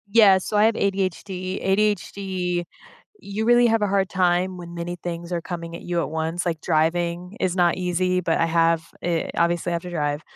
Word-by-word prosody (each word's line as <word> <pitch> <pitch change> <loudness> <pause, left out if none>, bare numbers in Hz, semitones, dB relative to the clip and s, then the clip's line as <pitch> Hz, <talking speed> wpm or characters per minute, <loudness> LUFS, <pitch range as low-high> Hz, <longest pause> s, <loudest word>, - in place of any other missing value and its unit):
Yes, 200 -4 +6
so, 210 - 0
I 210 - +5
have 225 0 +3
ADHD. 190 -1 -2
ADHD, 190 -3 0 0.6
you 205 +2 -3
really 240 +1 +5
have 225 -1 +2
a - - +2
hard 195 -1 +1
time 180 0 +1
when 170 -1 -9
many 170 +1 -4
things 170 0 -6
are 170 -1 -1
coming 170 -1 -6
at - - -9
you 175 -1 -1
at - - -3
once. 160 +2 -2
Like, 165 -2 -1
driving 170 +4 0
is 185 -1 0
not 175 -2 +3
easy, 180 0 0
but 165 -2 0
I - - +3
have, 165 0 +2 0.2
eh, 170 -2 -1
obviously, 170 +1 +1
I - - 0
have 170 - -1
to 180 - -6
drive, 145 -3 -1
180 Hz, 205 wpm, -23 LUFS, 170-190 Hz, 0.6 s, Yes